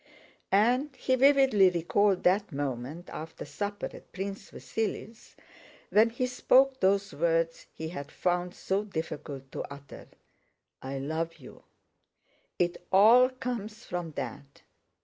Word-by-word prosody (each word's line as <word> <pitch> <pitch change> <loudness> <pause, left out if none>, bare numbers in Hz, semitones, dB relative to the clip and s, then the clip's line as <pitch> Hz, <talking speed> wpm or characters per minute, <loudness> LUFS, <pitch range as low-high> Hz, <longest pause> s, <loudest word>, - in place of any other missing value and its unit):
And 250 +8 +3
he 260 +1 -1
vividly 265 -7 +5
recalled 180 +3 +1
that 195 +2 +2
moment 140 +4 -4
after 160 +1 -7
supper 205 +8 -4
at - - -14
Prince 195 +1 -5
Vasíli's, 225 0 -5 0.6
when 220 +2 +5
he 240 +2 -2
spoke 260 +1 +3
those 200 +2 +2
words 165 0 0
he 160 0 -6
had 145 -3 -7
found 180 0 -1
so 195 +2 -1
difficult 145 -7 -6
to - - -4
utter: 140 -1 -11 0.7
"I 135 +1 -5
love 160 +4 -3
you." 130 - -14 0.9
"It 175 0 -1
all 230 +6 +7
comes 235 -3 -5
from 175 -3 -4
that! 140 -1 -7
190 Hz, 125 wpm, -29 LUFS, 160-225 Hz, 0.9 s, all